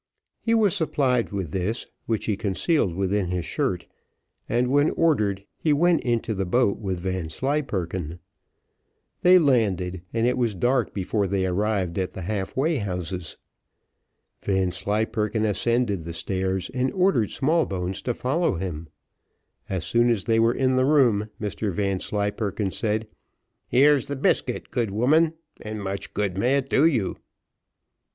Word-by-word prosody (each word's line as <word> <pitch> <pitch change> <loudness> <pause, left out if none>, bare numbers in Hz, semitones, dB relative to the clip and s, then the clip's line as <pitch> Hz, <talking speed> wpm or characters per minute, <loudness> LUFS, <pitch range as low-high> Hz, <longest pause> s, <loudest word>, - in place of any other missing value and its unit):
He 230 0 +2
was 210 -4 +3
supplied 135 - +1
with 95 -6 -3
this, 95 +7 -2 0.2
which 110 -2 -1
he 105 - 0
concealed 100 - 0
within 95 0 0
his 90 -1 -2
shirt, - - -2 0.6
and 120 +2 +1
when 145 +2 +4
ordered, 105 -12 +1
he 155 - +2
went 170 +3 +3
into 120 -2 0
the 100 -1 -1
boat 100 +2 +1
with 95 -4 -3
Vanslyperken. 95 - -2 1.0
They 180 +1 +7
landed, 100 - +1
and 115 0 0
it 125 +1 +1
was 115 -4 0
dark 120 +4 +1
before 100 +1 0
they 95 0 0
arrived 95 -1 0
at 90 -1 -2
the 95 - -6
half 100 +2 -3
way 155 +4 +2
houses. 90 - -4 1.0
Vanslyperken 105 +3 0
ascended 110 -3 0
the 85 +1 -6
stairs, 95 +4 -2
and 130 0 0
ordered 180 - +2
Smallbones 100 - 0
to 120 +3 -2
follow 145 - 0
him. 85 -3 -5 0.8
As 95 -4 -2
soon 120 +8 +3
as 110 -5 +1
they 115 +1 +2
were 115 +1 +3
in 130 -1 +2
the 130 - +3
room, 120 -8 +3
Mr 105 0 -2
Vanslyperken 100 +2 -1
said, 110 +1 -1 0.6
"Here 145 +4 +5
is 140 -2 -1
the 140 - -3
biscuit, 135 - 0
good 115 -3 0
woman, 155 +10 +3 0.3
and 110 0 -5
much 100 0 -5
good 100 -2 -1
may 125 +6 +3
it 135 -1 -3
do 150 +4 +5
you." 120 - 0
105 Hz, 145 wpm, -25 LUFS, 95-130 Hz, 1.0 s, They